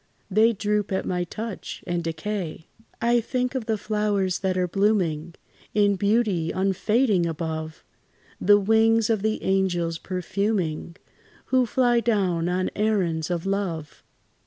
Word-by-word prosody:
They 220 +4 +5
droop 210 0 -1
at 190 - -1
my 180 -1 -1
touch, 215 +2 -6
and 175 -1 -2
decay. 165 -1 -4 0.3
I 235 +1 +3
think 250 +2 -2
of 255 -5 -3
the 220 -1 +1
flowers, 205 -3 0
that 190 -1 -1
are 180 -1 +1
blooming 175 -4 0 0.4
In 205 -1 +4
beauty 200 -4 +1
unfading 195 +1 +1
above, 160 -1 -4 0.6
The 205 +1 +5
wings 225 +2 +3
of 220 -3 +1
the 220 +1 -1
angels 175 -4 0
perfuming, 185 -3 -2 0.6
Who 255 -2 +4
fly 240 0 +3
down 190 -7 +1
on 185 +1 0
errands 185 -7 0
of 175 -1 -2
love. 185 -6 -3
195 Hz, 135 wpm, -25 LUFS, 175-215 Hz, 0.6 s, They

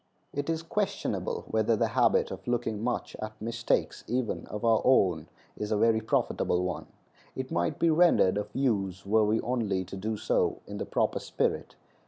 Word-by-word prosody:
It 145 +2 -3
is 165 0 -1
questionable 210 - -2
whether - - +2
the - - +1
habit 475 0 +3
of - - -8
looking 115 -3 -1
much 125 0 -2
at 110 0 -6
mistakes, 115 +2 -1
even 120 0 -2
of 105 +2 -5
our 115 -1 +4
own, 90 -11 +3 0.3
is 105 0 -4
a 105 - +2
very 110 +1 +3
profitable 90 -4 0
one. 90 - -3 0.5
It 130 0 -5
might 85 0 0
be 170 - +3
rendered 160 - +4
of 105 0 -2
use 100 -9 -1
were 110 +2 +3
we 110 +2 +2
only 105 -7 -1
to 95 - -8
do 110 +3 -3
so 105 - +1
in - - -7
the - - -4
proper - - 0
spirit. - - -2
110 Hz, 180 wpm, -29 LUFS, 105-130 Hz, 0.5 s, our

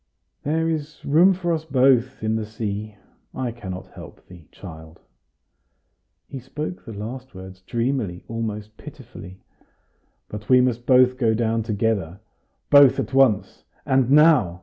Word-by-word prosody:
"There 160 +3 -1
is 155 -2 -5
room 165 +7 +5
for 175 -2 -2
us 160 -1 -2
both 130 -4 +2
in 110 0 0
the 110 - -2
sea. 105 -1 -5 0.4
I 125 -2 -3
cannot 95 -6 -8
help - - -13
thee, 85 -5 -16
child" 80 -3 -12 1.3
he 135 - -8
spoke 150 +7 -7
the 115 - -10
last 120 +4 -8
words 95 0 -11
dreamily, 115 -4 -3
almost 110 -2 -5
pitifully 120 -10 -12 0.9
"but 105 0 -9
we 130 -1 +6
must 125 -1 0
both 130 0 +4
go 115 -3 +2
down 115 0 0
together 105 -5 -2 0.5
both 140 -2 +7
at - - -4
once 130 -7 +2 0.2
and 130 -2 +2
now!" 145 - +4
120 Hz, 140 wpm, -22 LUFS, 105-135 Hz, 1.3 s, both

